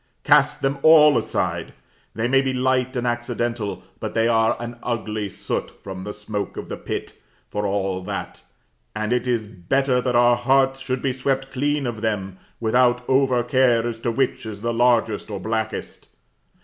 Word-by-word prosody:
Cast - - +4
them 135 +1 0
all 150 -2 +7
aside: - - -1 0.4
they 115 +1 0
may 135 +2 +4
be 135 -1 -1
light 130 0 +1
and 125 -1 -1
accidental; 120 -2 -2 0.2
but - - -5
they 115 0 +3
are 115 -1 +3
an 120 0 -7
ugly 110 -3 -3
soot - - -4
from 95 -1 -7
the 105 - -4
smoke 105 0 -5
of - - -6
the - - -3
pit, - - -5 0.4
for 105 0 -1
all 95 -2 -1
that; 90 - -6 0.5
and 110 +2 -1
it 125 +1 0
is 120 -3 0
better 125 +7 0
that 125 -1 -1
our 120 0 +5
hearts 135 +2 +2
should 130 -1 -3
be 135 -2 +1
swept 135 +1 -1
clean 145 +1 0
of 115 -3 -4
them, 95 -4 -2 0.2
without 125 +2 +2
over 130 -2 +3
care 120 -2 +3
as 115 -1 -4
to 120 - -1
which 130 +2 0
is 105 -1 -7
largest 115 -2 +1
or 100 -2 -4
blackest. 110 +3 -4
120 Hz, 175 wpm, -22 LUFS, 110-130 Hz, 0.5 s, all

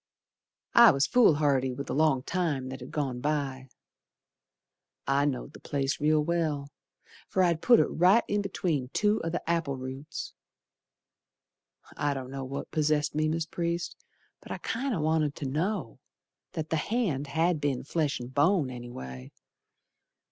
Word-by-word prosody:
I 235 -1 +9
was 140 -4 +3
foolhardy 145 - +3
with 140 - -5
the - - -4
long 145 -3 +2
time 150 -8 -1
that 130 - -6
had - - -9
gone 135 -5 -2
by. 135 -3 -2 1.4
I 140 +1 +2
know'd 135 -4 -3
the - - -12
place 140 -1 -2
real 155 0 +3
well, 150 -4 -1 0.6
Fer 190 - +2
I'd 170 -2 +2
put 240 -2 +6
it - - +5
right 185 +7 +4
in 205 0 0
between 165 -9 -2
two 210 +1 +2
o' 165 - -1
the 175 0 -4
apple 165 -5 0
roots. 130 +4 -6 1.6
I 145 -1 0
don't 130 -1 -6
know 135 0 -5
what 140 +2 -6
possessed 150 -1 +1
me, 155 +1 +1
Mis' 160 +1 -1
Priest, 170 +1 -3 0.4
But - - -12
I - - -3
kinder 240 -4 -2
wanted 155 -1 +1
to 145 - -5
know 155 - -2 0.5
That 155 -1 -4
the 160 - +2
hand 160 - -1
had 160 +2 +1
been 140 -3 -1
flesh 150 -1 -1
and 125 +1 -8
bone, 145 -1 +3
anyway. 65 - -8
150 Hz, 155 wpm, -28 LUFS, 135-170 Hz, 1.6 s, I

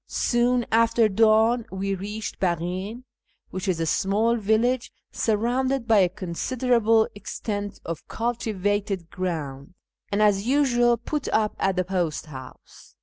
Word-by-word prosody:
Soon 240 0 +1
after 230 0 +4
dawn 220 +3 +3
we 195 +1 -2
reached 205 +3 -5
Baghin 185 +6 -2 0.5
(which 190 +2 -4
is 180 -3 0
a 165 - 0
small 210 +8 +1
village 230 +3 +1 0.2
surrounded 245 +3 0
by 220 -3 +5
a 185 -2 +4
considerable 225 +4 +1
extent 205 0 -5
of 165 -1 -6
cultivated 205 -5 -2
grouudj, 155 -5 -4 0.4
and, 205 +1 +2
as 205 0 +2
usual, 240 -3 +3
put 290 +5 -4
up 215 -1 +1
at 195 -1 +1
the 185 - +1
post 175 -5 -2
house. 130 -4 -12
210 Hz, 130 wpm, -25 LUFS, 185-235 Hz, 0.5 s, by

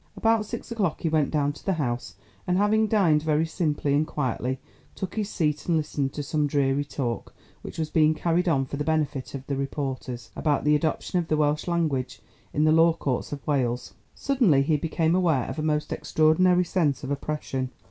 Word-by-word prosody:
About 225 -1 +2
six 235 +2 -6
o'clock 205 -8 -1
he 165 - 0
went 155 -3 +2
down 145 -2 0
to - - -14
the 195 - +1
House, 125 -7 -3 0.3
and 180 0 +2
having 215 +2 +3
dined 180 -8 +3
very 155 0 +1
simply 155 -4 -1
and 150 +2 +2
quietly, 130 -3 -2 0.4
took 190 - -5
his 210 -1 -2
seat 150 -6 -1
and 170 -2 +3
listened 145 -3 -1
to 145 - -4
some 150 0 0
dreary 140 -1 +1
talk, 130 -5 -4 0.3
which - - -9
was 155 -1 -2
being 155 -1 +4
carried 175 +3 +1
on 135 -4 +2
for 140 - -6
the 145 - -1
benefit 150 -4 -1
of 135 -1 -7
the 140 - -2
reporters, 135 -3 -4
about 145 -3 0
the 150 0 +4
adoption 160 +3 0
of 170 - -3
the 155 - +1
Welsh 150 +1 +1
language 155 -7 -1 0.3
in 150 - +1
the 155 - +4
law 165 +1 +5
courts 135 -6 -3
of 145 -1 -6
Wales. 125 -4 -1 0.2
Suddenly 235 - +3
he 155 +2 +2
became 160 +2 0
aware 170 -8 +2
of - - -5
a - - 0
most 150 -1 0
extraordinary 175 +3 +3
sense 155 -6 0
of 135 - -4
oppression. 140 -2 -3
150 Hz, 200 wpm, -26 LUFS, 140-170 Hz, 0.4 s, law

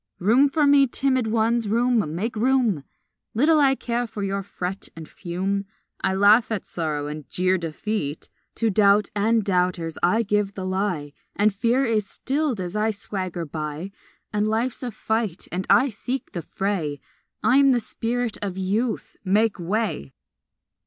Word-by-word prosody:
Room 240 +9 +4
for 300 +1 +2
me, 280 -1 +6
timid 260 -1 0
ones, 225 +1 +1
room, 225 -6 +1
make 220 +7 -2
room! 235 - +2 0.5
Little 305 +7 +4
I 270 -2 +4
care 240 -1 -2
for 210 -2 -6
your 195 0 -1
fret 190 -1 -5
and 160 -1 -9
fume 195 +2 -3 0.4
I 190 - +1
laugh 210 +4 +5
at 215 - -2
sorrow 155 -4 -3
and 150 -1 -7
jeer 185 +1 +1
defeat; 165 -1 -3 0.3
To 225 -2 +1
doubt 200 +1 +4
and 220 +2 +2
doubters 180 -4 0
I 220 +7 +3
give 205 -1 0
the 190 - -4
lie, 185 -6 -2 0.2
And 210 0 +3
fear 235 +6 +2
is 215 -4 0
stilled 275 0 -1
as 180 +1 -4
I 215 +1 +1
swagger 185 -4 -4
by, 155 +4 -5 0.4
And 210 0 +1
life's 225 +3 -1
a 250 - -3
fight 220 -4 -2
and 185 +2 -3
I 270 - +5
seek 250 +4 -4
the 175 - -4
fray; 165 -5 -2 0.4
I 255 - +5
am 275 -1 +6
the 245 - +3
spirit 235 +1 -3
of 195 -2 -3
Youth; 210 +6 -2
make 210 +2 +2
way! 180 - -2
210 Hz, 160 wpm, -24 LUFS, 185-235 Hz, 0.5 s, me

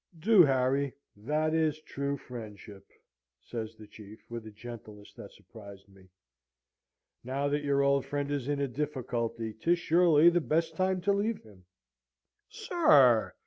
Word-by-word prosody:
"'Do, 195 +3 +6
Harry; 135 +1 +1 0.2
that 150 +9 -1
is 155 -1 +1
true 140 -1 -4
friendship!' 105 -6 -11 0.5
says 110 - -7
the 110 -1 -13
Chief, 105 +1 -14
with 115 -2 -7
a - - -10
gentleness 105 -2 -11
that - - -12
surprised 100 -2 -14
me. 95 -1 -21 1.1
'Now 135 +3 -2
that 145 +1 -1
your 140 -1 +1
old 140 -1 +1
friend 145 0 -3
is 140 -3 -3
in 145 -1 -1
a 140 - 0
difficulty, 120 -5 -4
'tis 170 +11 +1
surely 170 -1 +4
the 175 0 +1
best 160 +1 -1
time 185 +1 0
to 200 +3 +1
leave 210 +2 -2
him.' 100 -5 -19 0.8
"'Sir!' 140 - +3
140 Hz, 145 wpm, -29 LUFS, 110-155 Hz, 1.1 s, Do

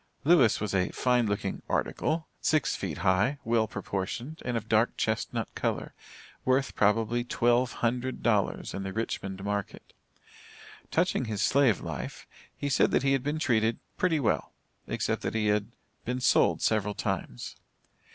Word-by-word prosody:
Lewis 140 -7 +5
was 105 -1 -3
a 90 -2 +2
fine 125 -2 +2
looking 100 0 -2
"article," 160 +1 -1
six 155 -1 +2
feet 85 -7 -4
high, 100 +10 +3
well 115 -1 +2
proportioned, 105 - -4
and 120 -1 -1
of 110 - -4
a - - -26
dark 110 +1 +2
chestnut - - -2
color, - - -2 0.5
worth 130 +1 +1
probably 115 +3 +2
$1200, 120 -2 0
in 100 - -4
the 95 0 -4
Richmond 95 -3 -3
market. 100 -1 -4 1.0
Touching 170 -6 +1
his 110 -3 -2
slave 135 -7 +3
life, - - -6 0.3
he 145 - -3
said 135 - +3
that - - +2
he 135 0 +3
had 135 - +1
been 145 +3 -2
treated 115 -7 +2 0.2
"pretty 170 -4 +1
well," 120 - 0 0.3
except - - -1
that - - -3
he 105 -1 +1
"had 105 0 +1 0.4
been 125 +2 -2
sold 125 - +3
several 105 -2 +1
times." - - -3
115 Hz, 150 wpm, -29 LUFS, 105-130 Hz, 1.0 s, Lewis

